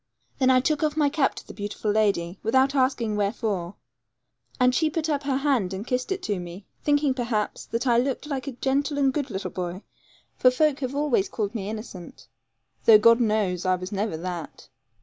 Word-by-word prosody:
Then 260 -1 +4
I 255 -1 +5
took 300 +2 0
off 305 -1 0
my 295 -2 +3
cap 285 -2 +1
to - - -9
the - - -10
beautiful 205 0 -3
lady, 200 -4 0
without 260 +4 +2
asking 255 -5 +1
wherefore; 200 -3 -2 0.8
and 250 0 +4
she 315 +3 +2
put 320 +1 -2
up 290 -2 0
her 275 -2 -1
hand 260 -10 0
and 200 +3 -6
kissed 250 +5 -2
it 385 -1 -2
to 205 -4 -1
me, 175 +3 -9 0.2
thinking, 290 -2 +2
perhaps, 235 -4 -2
that 230 +3 -2
I 240 -2 +4
looked 265 +3 -1
like 280 -2 -4
a 275 - -4
gentle 275 +4 -1
and 270 -2 +2
good 285 -2 -2
little 195 -2 -4
boy; 180 +2 -5 0.6
for 255 - +6
folk 290 +2 +1
always 270 -5 0
called 210 -1 -3
me 205 -3 -4
innocent, 215 -5 -8 0.6
though 220 -2 +9
God 230 +2 +5
knows 210 -6 +1
I 185 0 +2
never 205 +2 -1
was 160 - -5
that. 175 -3 -6
240 Hz, 195 wpm, -25 LUFS, 205-275 Hz, 0.8 s, though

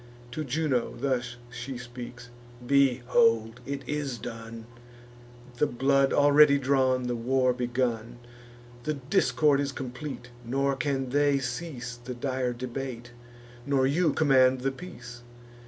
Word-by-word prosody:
To 155 +5 -3
Juno 140 -3 -1
thus 125 -2 -1 0.2
she 120 +2 -6
speaks: 120 0 -9 0.3
"Behold! 125 -3 +3
It 140 0 -5
is 145 -4 -2
done, 115 0 -8 0.9
The 150 - +3
blood 135 +2 +2
already 145 0 +6
drawn, 130 -2 +2
the 125 -1 -1
war 130 +2 +2
begun; 120 -1 -2 0.6
The 155 +4 -2
discord 145 0 +2
is 140 -1 -1
complete; 125 -1 -7
nor 135 +3 0
can 135 0 -1
they 145 +1 +3
cease 125 -2 -5
The 125 +1 -6
dire 130 0 -1
debate, 120 -1 -6 0.6
nor 135 -2 +3
you 155 +4 +2
command 130 -3 +4
the 135 +1 0
peace. 125 -6 -10
130 Hz, 125 wpm, -28 LUFS, 120-140 Hz, 0.9 s, already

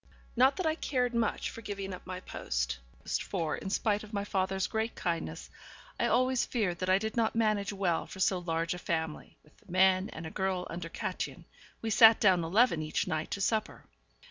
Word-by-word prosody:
Not 260 +3 +5
that 370 - -3
I 315 - +3
cared 250 -6 -1
much 230 -2 0
for 230 - -9
giving 200 -3 -5
up 180 - -10
my 185 0 -4
post, - - -3 0.3
for, 160 -3 -1
in 195 - -6
spite 210 +1 +1
of 215 - -11
my 200 -1 -1
father's 190 -1 0
great 220 +1 -2
kindness, 170 -2 -3 0.5
I - - +2
always 255 0 +2
feared 200 -8 -1
that 185 - -2
I 185 - +6
did 220 +2 -3
not 230 -2 +1
manage 215 -3 +1
well 190 -4 0
for 190 - -10
so 190 -1 +2
large 165 -1 -1
a 180 - -6
family 160 -4 -3
(with 150 - -24
the - - -17
men, 185 +1 +4
and 165 - -8
a 160 - -6
girl 190 -1 -1
under 170 -1 -5
Kätchen, - - -4 0.4
we 225 - -1
sat 225 +1 +8
down 185 -5 +4
eleven 185 0 +3
each 155 0 -1
night 155 0 -2
to 200 - -3
supper). 215 +2 -1
190 Hz, 200 wpm, -31 LUFS, 170-220 Hz, 0.5 s, sat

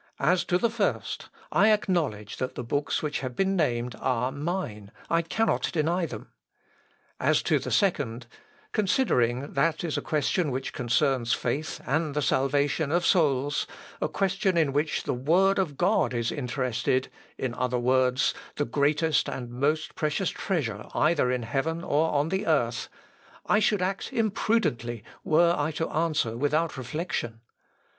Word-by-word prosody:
"As 180 0 +2
to 180 - +2
the 230 +4 +1
first, 225 -3 -2 0.2
I 215 - +5
acknowledge 160 - 0
that 130 - -3
the - - -4
books 145 +6 -1
which 150 -2 -1
have 130 -2 -5
been 195 +6 +1
named 125 -7 0
are 125 0 0
mine: 145 - -4 0.2
I 165 0 +4
cannot 225 +7 0
deny 170 +2 0
them. - - -9 0.9
"As - - +2
to - - +2
the - - -5
second, 135 - +1 0.5
considering 140 - +1
that 160 +4 +1
is 165 -3 -1
a - - -6
question 155 +2 0
which 130 0 -3
concerns 125 0 +1
faith 140 +6 -2
and 150 +1 0
the 150 - +1
salvation 140 +3 +1
of 175 +2 +2
souls, 145 -4 +2 0.3
a - - +2
question 190 +1 0
in 155 -5 +2
which 150 +2 0
the - - -1
Word 180 +10 +3
of 155 -8 -1
God 180 - +2
is 115 -1 0
interested, 130 -1 -1 0.3
in 130 -3 -2
other 125 0 -1
words, 130 +2 +2 0.2
the 145 - 0
greatest 150 +2 +1
and 120 -2 -5
most 150 +5 0
precious 155 +4 -1
treasure 125 - -2
either 150 -5 +3
in 125 -2 -1
heaven 155 +8 -2
or 155 +3 +2
on 145 +2 +1
the 190 +2 -1
earth, 120 -7 +1 0.6
I 210 - +3
should 210 -3 +2
act 195 +1 -2
imprudently 170 - 0 0.2
were 170 +2 +4
I 145 -1 0
to 160 +1 -1
answer 155 -8 0
without 150 +5 0
reflection. 130 -3 -4
150 Hz, 155 wpm, -27 LUFS, 125-170 Hz, 0.9 s, I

